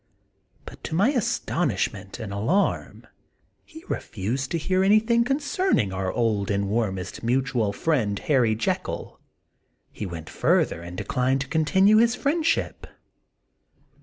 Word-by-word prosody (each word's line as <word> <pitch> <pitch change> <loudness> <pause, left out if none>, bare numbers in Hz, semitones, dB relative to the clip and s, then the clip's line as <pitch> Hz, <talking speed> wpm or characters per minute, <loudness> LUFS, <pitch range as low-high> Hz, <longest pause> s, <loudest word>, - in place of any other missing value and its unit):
But - - -12
to - - -3
my 200 +9 +4
astonishment 120 - -1
and 100 -3 -6
alarm, 155 - 0 0.6
he 320 +1 -13
refused 120 +7 -3
to 170 - -1
hear 185 +4 +1
anything 220 +4 +4
concerning 285 - 0
our 95 0 -2
old 110 -4 0
and 100 -1 0
warm 105 -3 0
est 90 -2 -7
mutual 125 -3 0
friend, 110 -6 0
Harry 120 -6 +2
Jekyll; 110 - -3 0.7
he 105 - -5
went 80 -3 -7
further 85 - +1
and 85 +1 -8
declined 130 +6 0
to 140 - -4
continue 190 +8 +4
his 235 +2 +4
friend 300 +6 0
ship. 330 - -1
130 Hz, 135 wpm, -25 LUFS, -, 0.7 s, my